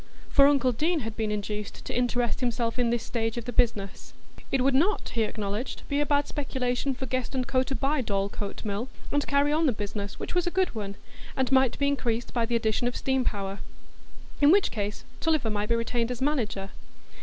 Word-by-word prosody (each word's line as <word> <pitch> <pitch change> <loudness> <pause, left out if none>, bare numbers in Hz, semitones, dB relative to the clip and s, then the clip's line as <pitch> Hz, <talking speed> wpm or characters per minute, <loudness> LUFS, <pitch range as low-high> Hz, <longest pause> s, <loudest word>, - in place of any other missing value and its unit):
For 280 0 +7
uncle 275 -3 +4
Deane 315 +7 +1
had 225 -2 -5
been 220 -1 -1
induced 210 0 -4
to - - -4
interest 245 -1 +1
himself 240 -1 -1
in 240 -1 +3
this 235 -1 0
stage 225 0 -2
of 235 - -4
the 245 - -4
business. 205 -4 0 0.4
It 270 - +2
would 270 +1 +3
not, 350 +10 +2
he 230 - -1
acknowledged, 210 +2 -3
be 285 - +1
a 295 - 0
bad 285 0 +2
speculation 260 -1 -1
for 265 - -4
Guest 255 +1 -2
& 250 - -4
Co. 255 - +2
to 270 +1 -2
buy 280 +1 +1
Dorlcote 200 -1 -3
Mill, 210 +5 -2 0.2
and 290 -1 +1
carry 285 +1 +3
on 315 +1 +3
the - - +4
business, 205 -2 -5
which - - -5
was 355 0 +1
a - - +4
good 375 +1 +1
one, 200 -3 -4 0.4
and 265 0 +1
might 265 -2 +4
be 280 - +1
increased 240 -4 -1
by 235 -2 +1
the 240 - 0
addition 225 +1 +1
of 245 - -2
steam 265 -1 +1
power; 200 -3 -2 0.8
in 285 - +7
which 395 +1 +4
case 205 -1 -3 0.2
Tulliver 310 -9 +1
might 210 +1 -1
be 235 - +4
retained 230 0 0
as 250 -1 -3
manager. 230 -9 -1
245 Hz, 215 wpm, -27 LUFS, 220-275 Hz, 0.8 s, For